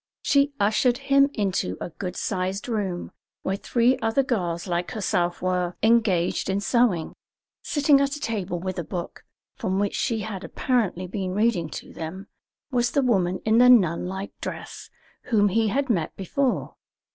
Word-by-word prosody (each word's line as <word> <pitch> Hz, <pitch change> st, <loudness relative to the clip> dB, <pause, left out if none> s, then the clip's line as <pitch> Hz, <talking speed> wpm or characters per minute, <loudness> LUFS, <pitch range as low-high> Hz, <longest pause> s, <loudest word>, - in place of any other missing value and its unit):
She 280 Hz, 0 st, +3 dB
ushered 220 Hz, +4 st, +3 dB
him 275 Hz, +1 st, +3 dB
into 190 Hz, -, -1 dB
a -, -, -5 dB
good 180 Hz, +2 st, -6 dB
sized 190 Hz, +1 st, -2 dB
room, 200 Hz, -7 st, -3 dB, 0.3 s
where 190 Hz, -, -1 dB
three 240 Hz, +5 st, +2 dB
other 225 Hz, +4 st, +1 dB
girls 175 Hz, -9 st, -2 dB
like 175 Hz, -1 st, -2 dB
herself 175 Hz, -4 st, -1 dB
were 180 Hz, -1 st, 0 dB
engaged 215 Hz, -7 st, +2 dB
in 190 Hz, +1 st, +1 dB
sewing. 205 Hz, -6 st, +1 dB, 0.5 s
Sitting 290 Hz, -2 st, +3 dB
at 280 Hz, +1 st, 0 dB
a -, -, -7 dB
table 200 Hz, -, -2 dB
with 185 Hz, 0 st, -4 dB
a -, -, -2 dB
book, 175 Hz, +2 st, -6 dB, 0.3 s
from 190 Hz, 0 st, -1 dB
which 205 Hz, 0 st, 0 dB
she 225 Hz, -2 st, -1 dB
had 200 Hz, -3 st, -5 dB
apparently 215 Hz, -8 st, -1 dB
been 185 Hz, 0 st, -4 dB
reading 205 Hz, -7 st, +1 dB, 0.2 s
to -, -, -14 dB
them, 175 Hz, +5 st, -6 dB, 0.5 s
was 245 Hz, -1 st, +2 dB
the 280 Hz, -, +1 dB
woman 185 Hz, -7 st, +1 dB
in 220 Hz, +1 st, +4 dB
the 250 Hz, 0 st, +7 dB
nun 180 Hz, -9 st, +4 dB
like 190 Hz, +2 st, -5 dB
dress -, -, -7 dB, 0.4 s
whom 205 Hz, -3 st, +3 dB
he 220 Hz, +3 st, +2 dB
had 275 Hz, +6 st, 0 dB
met 180 Hz, -, -1 dB
before. 250 Hz, +7 st, -1 dB
200 Hz, 165 wpm, -25 LUFS, 180-240 Hz, 0.5 s, the